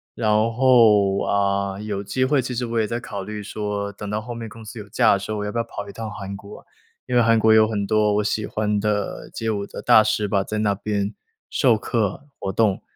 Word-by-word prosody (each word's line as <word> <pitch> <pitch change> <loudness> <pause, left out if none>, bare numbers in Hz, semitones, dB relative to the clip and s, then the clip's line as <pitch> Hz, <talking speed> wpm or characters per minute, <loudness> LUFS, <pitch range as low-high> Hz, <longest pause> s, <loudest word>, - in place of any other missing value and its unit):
然 110 -2 0
后， 110 -3 +4
啊， 100 -1 0
有 105 -2 -3
机 130 +6 -1
会 140 +1 +2
其 125 0 -5
实 125 +1 -1
我 115 -1 -1
也 110 - +1
在 120 +2 -3
考 100 -3 -6
虑 105 0 -6
说， 105 -1 -3
等 100 0 -8
到 105 +1 -2
后 120 +2 -7
面 115 -1 -6
公 115 +1 -12
司 110 +2 -9
有 105 - -9
假 105 - +3
的 100 - +1
时 100 - -8
候， 110 -1 -2
我 - - -3
要 105 - -3
不 115 - -4
要 115 - +1
跑 100 0 -7
一 - - -7
趟 110 +1 -6
韩 100 -1 -7
国。 100 +1 -12 0.4
因 125 - -5
为 120 - +6
韩 115 0 +4
国 110 0 +5
有 110 0 +6
很 105 -2 -2
多 105 0 +2
我 105 - +1
喜 105 +1 -1
欢 105 -1 -1
的 105 0 -2
街 115 0 -3
舞 100 -2 -2
的 - - -8
大 110 - +6
师 110 0 0
吧， 100 -1 +1
在 110 +2 -3
那 105 -2 +2
边 100 0 -2 0.4
授 120 -4 +3
课、 110 +4 -2
活 - - -3
动， 105 -2 +2
105 Hz, 270 characters per minute, -22 LUFS, 100-115 Hz, 0.4 s, 为